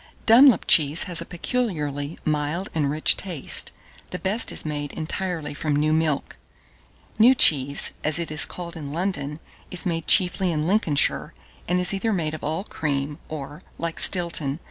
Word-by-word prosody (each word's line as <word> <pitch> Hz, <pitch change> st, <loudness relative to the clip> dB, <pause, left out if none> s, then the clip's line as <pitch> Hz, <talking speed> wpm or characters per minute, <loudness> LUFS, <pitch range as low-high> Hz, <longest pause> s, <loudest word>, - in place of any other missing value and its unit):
Dunlop 235 Hz, -1 st, +5 dB
cheese 150 Hz, +1 st, +4 dB
has 175 Hz, -2 st, -3 dB
a -, -, -6 dB
peculiarly 165 Hz, -, -4 dB
mild 155 Hz, +5 st, -2 dB
and 150 Hz, -3 st, -1 dB
rich 155 Hz, +2 st, +2 dB
taste: 175 Hz, -8 st, +1 dB, 0.4 s
the -, -, -6 dB
best 195 Hz, +6 st, 0 dB
is -, -, 0 dB
made 145 Hz, -2 st, -5 dB
entirely 160 Hz, -2 st, -5 dB
from 145 Hz, 0 st, -3 dB
new 155 Hz, +1 st, 0 dB
milk. 155 Hz, -3 st, -2 dB, 0.8 s
New 245 Hz, +4 st, +6 dB
cheese 140 Hz, -, +5 dB
(as 155 Hz, 0 st, +2 dB
it 170 Hz, -2 st, -2 dB
is 155 Hz, -, +3 dB
called 175 Hz, -1 st, -8 dB
in 145 Hz, -3 st, -8 dB
London) 150 Hz, -4 st, -4 dB, 0.3 s
is 180 Hz, 0 st, -1 dB
made 165 Hz, -3 st, -3 dB
chiefly 185 Hz, 0 st, +3 dB
in 155 Hz, -1 st, -2 dB
Lincolnshire, 170 Hz, -7 st, 0 dB, 0.3 s
and 180 Hz, +1 st, 0 dB
is 180 Hz, +2 st, +2 dB
either 210 Hz, +3 st, -2 dB
made 160 Hz, -6 st, -2 dB
of 155 Hz, -, -8 dB
all 160 Hz, +5 st, -3 dB
cream, 145 Hz, -6 st, -4 dB
or, 150 Hz, +1 st, -8 dB, 0.2 s
like 165 Hz, -1 st, -5 dB
Stilton. 165 Hz, -5 st, +3 dB
160 Hz, 165 wpm, -22 LUFS, 150-180 Hz, 0.8 s, New